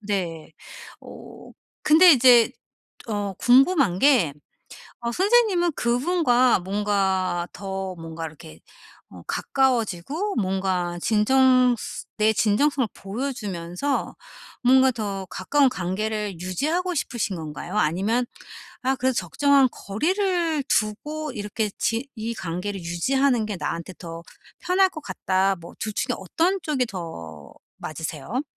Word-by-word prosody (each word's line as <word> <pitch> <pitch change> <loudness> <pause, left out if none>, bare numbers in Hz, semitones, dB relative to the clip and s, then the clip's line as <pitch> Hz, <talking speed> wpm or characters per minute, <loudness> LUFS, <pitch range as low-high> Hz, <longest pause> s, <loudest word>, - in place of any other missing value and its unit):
네. 180 -7 -4 0.5
어 - - -12 0.3
근데 330 +3 +7
이제 245 -3 +6 0.6
어 205 -3 -2
궁금한 255 - +4
게 250 - +4 0.7
어 235 0 -3
선생님은 390 - +3
그분과 250 - +2
뭔가 190 -2 0
더 190 -1 -5
뭔가 165 0 -7
이렇게 140 - -10 0.5
어 90 -2 -12
가까워지고 265 - -1
뭔가 185 -3 -1
진정스 255 +2 +2
내 220 0 +3
진정성을 235 +5 +2
보여주면서 205 0 -4 0.5
뭔가 260 +1 +6
더 200 -4 -4
가까운 285 -2 +2
관계를 205 -1 -3
유지하고 310 - -1
싶으신 240 - -2
건가요? 160 +4 -6
아니면 205 +9 +1 0.6
'아 265 +1 +1
그래도 260 0 0
적정한 270 - +3
거리를 335 - -1
두고 295 +8 -1
이렇게 210 -1 -3
지 235 +4 -1
이 225 0 -4
관계를 185 +1 -4
유지하는 235 +8 +1
게 210 -3 -4
나한테 170 +2 -4
더 165 -1 -8 0.4
편할 375 +1 +3
것 310 - -8
같다.' 190 -3 0
뭐 170 - -12
2 215 - -3
중에 - - -1
어떤 335 - 0
쪽이 265 -5 0
더 85 - -8 0.3
맞으세요? 160 - -4
215 Hz, 245 characters per minute, -24 LUFS, 185-270 Hz, 0.7 s, 근데